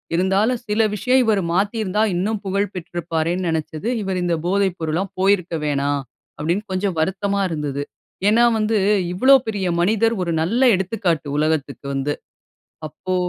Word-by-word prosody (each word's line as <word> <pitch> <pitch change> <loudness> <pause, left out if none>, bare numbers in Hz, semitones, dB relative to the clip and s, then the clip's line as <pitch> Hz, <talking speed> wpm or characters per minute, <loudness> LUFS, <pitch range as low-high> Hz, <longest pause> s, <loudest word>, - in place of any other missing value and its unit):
இருந்தாலும், 195 +7 +2
சில 210 +2 +2
விஷயம் 255 +5 +2
இவரு 215 -3 +2
மாத்திருந்தா, 205 +1 0
இன்னும் 205 +5 -1
புகழ் 200 +1 -1
பெற்றிருப்பாரேன்னு 175 0 -2
நினைச்சது, 160 +4 -3
இவரு 190 -2 -2
இந்த 170 -1 +1
போதை 195 +2 +2
பொருள்லாம் 165 +4 -2
போயிருக்க 190 -3 +2
வேணாம், 145 -1 0 0.4
அப்பிடீன்னு 175 +8 -2
கொஞ்சம் 185 -1 -1
வருத்தமா 200 +4 0
இருந்தது. 150 -3 -3 0.5
ஏன்னா, 225 +3 +5
வந்து 215 0 +1 0.4
இவ்வளோ 260 +9 +6
பெரிய 200 -4 -1
மனிதர். 220 +5 +2
1 170 - -2
நல்ல 225 +11 0
எடுத்துக்காட்டு 185 -5 -1
உலகத்துக்கு 150 -2 -1
வந்து. 135 +2 -1 0.7
அப்போ, 185 +5 -5
185 Hz, 135 wpm, -21 LUFS, 160-205 Hz, 0.7 s, இவ்வளோ